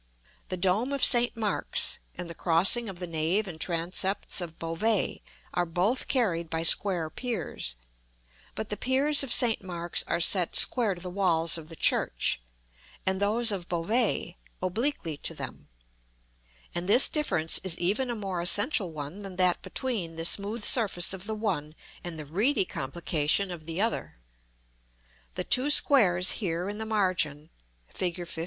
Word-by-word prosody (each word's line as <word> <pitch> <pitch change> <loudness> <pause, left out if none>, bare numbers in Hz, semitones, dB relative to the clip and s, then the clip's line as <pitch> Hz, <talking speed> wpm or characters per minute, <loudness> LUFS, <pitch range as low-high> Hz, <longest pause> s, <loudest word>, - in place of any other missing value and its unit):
The 185 - -4
dome 195 +9 0
of 280 - +4
St. 240 -2 +4
Mark's, 215 -2 0 0.2
and 175 - -7
the 170 - -7
crossing 190 +8 +3
of 190 - -9
the 180 - -5
nave 170 +5 -1
and 160 -4 -9
transepts 185 +3 -1
of 165 -2 -8
Beauvais, 180 +6 -1 0.3
are 175 0 -1
both 185 +10 -1
carried 180 - -1
by 160 0 -2
square 175 -1 +2
piers; 195 - -5 0.8
but 220 - -5
the 210 - -3
piers 275 +3 +2
of 275 -4 -2
St. 235 -3 +3
Mark's 175 -2 -2
are 170 - -1
set 175 +1 +1
square 225 -7 +4
to 175 - -11
the 180 - -6
walls 170 -4 +2
of 160 -2 -4
the 165 - -9
church, - - +1 0.6
and 190 0 -1
those 220 +3 +2
of 185 -3 -5
Beauvais 180 +1 -1 0.2
obliquely 185 - -2
to - - 0
them: - - -8 1.0
and 175 +2 -2
this 240 +6 +8
difference 170 - +2
is 180 -3 +2
even 210 +9 0
a 240 - -3
more 195 -5 -4
essential 200 - +2
one 155 +5 -7
than 195 -2 -8
that 180 -1 +1
between 205 -11 -2
the 165 0 -2
smooth 210 +5 +2
surface 200 -7 +2
of 190 +1 -7
the 220 - -3
one 175 -8 -3 0.3
and 175 -2 -5
the 155 - -7
reedy 200 - +1
complication 160 +6 -2
of 160 -3 -9
the 165 +2 -5
other. 225 - -2 1.2
The - - -3
two 255 +4 +2
squares 190 -12 +6
here 175 -2 -2
in 205 +1 -6
the 220 - -4
margin 170 -8 -1 0.4
(Fig. 175 -2 -2
XV.) 165 - -7
185 Hz, 160 wpm, -27 LUFS, 170-220 Hz, 1.2 s, this